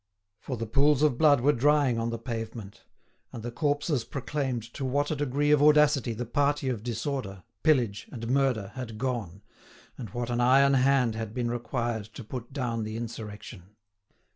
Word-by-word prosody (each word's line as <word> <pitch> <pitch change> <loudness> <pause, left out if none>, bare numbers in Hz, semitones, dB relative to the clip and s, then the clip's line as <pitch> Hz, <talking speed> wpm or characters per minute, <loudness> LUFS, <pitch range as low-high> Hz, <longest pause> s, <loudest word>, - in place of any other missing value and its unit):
For 130 +1 -5
the 115 - -3
pools 140 +5 +3
of 145 -5 +2
blood 145 -5 +5
were 145 +4 +4
drying 140 -2 +3
on 115 0 -1
the 115 - -3
pavement, 115 -3 -7 0.5
and 115 - -8
the 120 - -4
corpses 145 -1 0
proclaimed 130 -1 -3
to 140 - -5
what 145 +3 0
a - - 0
degree 145 +1 0
of 150 -1 +5
audacity 150 -5 +4
the 120 +3 -4
party 145 +3 0
of 120 -5 -2
disorder, 115 -4 -4 0.2
pillage, 125 -10 +2
and 115 -3 -6
murder 125 -6 +1
had 120 -4 -7
gone, 110 -7 -3 0.6
and 115 -5 -6
what 120 +4 -4
an 120 0 0
iron 135 +3 +5
hand 130 -3 +3
had 110 -1 -5
been 120 -2 -1
required 120 -2 -2
to 130 - -7
put 120 +2 -7
down 120 -5 -2
the 110 +1 -5
insurrection. 105 -4 -8
125 Hz, 175 wpm, -28 LUFS, 115-140 Hz, 0.6 s, blood